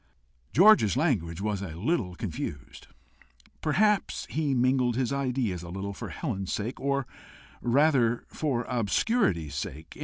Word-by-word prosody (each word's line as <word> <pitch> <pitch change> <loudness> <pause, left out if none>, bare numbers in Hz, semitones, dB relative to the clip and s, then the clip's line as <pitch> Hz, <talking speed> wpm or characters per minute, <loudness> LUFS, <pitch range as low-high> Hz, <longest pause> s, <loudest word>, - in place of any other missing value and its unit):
George's 180 - +6
language 85 +2 0
was 105 -2 -1
a 85 -6 -6
little 100 - -1
confused. 80 - -6 0.7
Perhaps 205 +7 +1
he 150 -3 0
mingled 125 -1 +2
his 130 +1 0
ideas 125 -9 -1
a 85 - -9
little 95 +3 -4
for - - -7
Helen's 100 - -4
sake 110 +4 -3
or 140 -1 0 0.6
rather 120 -2 +3
for 135 -6 -1
obscurity's 115 - 0
sake. 80 +3 -6
120 Hz, 125 wpm, -28 LUFS, 95-140 Hz, 0.7 s, George's